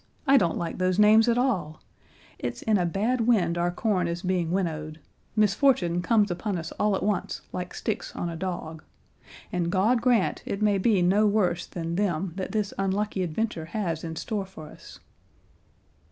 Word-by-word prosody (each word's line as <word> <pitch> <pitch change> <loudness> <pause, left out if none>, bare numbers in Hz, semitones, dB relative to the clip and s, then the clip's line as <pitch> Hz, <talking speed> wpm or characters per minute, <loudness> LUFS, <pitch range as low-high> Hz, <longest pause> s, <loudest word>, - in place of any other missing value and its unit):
I 275 -1 +5
don't 175 -11 +3
like 170 +1 -4
those 185 0 +1
names 215 +2 +6
at 235 - +2
all; 195 - 0 0.6
'it's 120 -1 -4
in 215 -3 +2
a 175 - +1
bad 220 +8 0
wind 180 -8 +3
our 175 0 +1
corn 180 -1 0
is 170 +1 -4
being 180 -3 0
winnowed;' 160 -4 -2 0.4
'misfortune 205 -4 +3
comes 210 0 +2
upon 180 +2 -2
us 165 0 -6
all 210 -1 +2
at - - -3
once 205 +1 -1
like - - -5
sticks - - -4
on - - -3
a 170 - -4
dog,' 165 -3 -5 0.7
and 170 -1 -1
God 220 +6 +2
grant 235 -5 +2
it 195 - -4
may 205 -2 +2
be 195 -2 +3
no 200 +4 +4
worse 180 -5 +1
than 170 0 -4
them 185 -3 -1
that 190 -1 -4
this 210 -2 -1
unlucky 195 +1 -1
adventure 175 0 -2
has 170 -3 -3
in 165 -1 -5
store 200 +2 -3
for 155 -5 -11
us." - - -14
190 Hz, 180 wpm, -26 LUFS, 170-210 Hz, 0.7 s, names